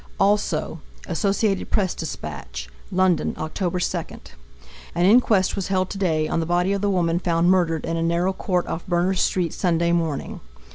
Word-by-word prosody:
Associated 195 +3 0
Press 190 -4 +1
Dispatch. 70 - -6 0.2
London, 185 -2 +2
Oct. 155 0 -5
2. 180 -1 -2 0.8
An 175 +1 +2
inquest 210 -3 +4
was 195 - -3
held 185 -1 0
today 165 -6 0
on - - -1
the 165 - -2
body 175 +3 +1
of 200 - -1
the 205 - +1
woman 175 -3 +1
found 170 0 +2
murdered 170 -4 +1
in 165 - -2
a - - -1
narrow 170 +3 +1
court 180 -2 -1
off 165 - -4
Berners 180 +1 +1
street 175 -3 0
Sunday 170 -2 +1
morning. 165 -4 -1
175 Hz, 155 wpm, -23 LUFS, 165-190 Hz, 0.8 s, inquest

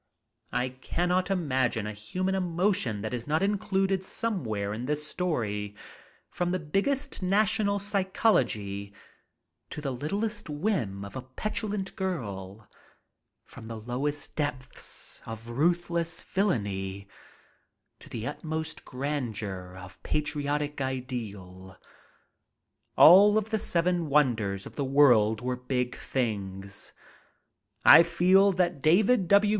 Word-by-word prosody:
I 125 +1 0
cannot 175 +8 -1
imagine 130 - 0
a 105 - -4
human 185 - -2
emotion 180 - 0
that 110 +3 -4
is 120 0 -4
not 155 +5 +1
included 195 -1 +1
somewhere 120 - -2
in 115 +3 -4
this 150 +2 0
story 105 - -2 0.5
from 175 0 -2
the 185 - +1
biggest 205 - -1
national 205 +2 +2
psychology 125 - 0 0.7
to - - -6
the 145 -2 -3
littlest 200 - -3
whim 145 - -1
of 100 - -10
a 130 - -4
petulant 205 - -4
girl; 105 - -4 0.8
from 110 - -12
the 115 0 -6
lowest 130 +6 -3
depths 130 -3 -5
of 115 +1 -8
ruthless 170 +4 0
villainy 100 - -1 0.9
to - - -14
the 115 -1 -5
utmost 160 +4 -4
grandeur 110 -10 -4
of 90 0 -12
patriotic 150 -1 -2
ideal. 105 -8 -5 1.2
All 200 +5 +8
of 220 +1 -1
the 220 - +1
seven 175 -2 +1
wonders 110 -9 +2
of - - -10
the 145 - -1
world 125 -6 +4
were 125 0 -1
big 125 0 -2
things. 100 -5 -3 0.9
I - - +11
feel 185 +4 +4
that 175 -5 0
David 195 - +4
W. 200 +3 +5
145 Hz, 115 wpm, -28 LUFS, 110-185 Hz, 1.2 s, I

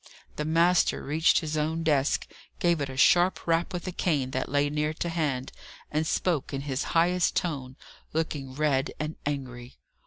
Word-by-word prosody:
The 150 - -3
master 170 +3 +3
reached 160 +6 +3
his 155 -1 -3
own 160 +2 -1
desk, 145 -3 +1 0.3
gave 170 -3 +2
it 140 - -2
a 130 - -7
sharp 175 +6 +4
rap 165 +2 +1
with 180 -2 -5
a 185 - -3
cane 145 -7 0
that 130 0 -2
lay 145 +1 +2
near 150 +1 -1
to 170 - -3
hand, 145 -6 -2 0.4
and 155 +1 0
spoke 155 -6 0
in 135 - -3
his 140 -1 -2
highest 180 +2 +3
tone, 135 -7 -2 0.4
looking 145 -4 -3
red 145 -2 +1
and 155 +1 -3
angry. 130 -4 -5
150 Hz, 175 wpm, -27 LUFS, 135-165 Hz, 0.4 s, sharp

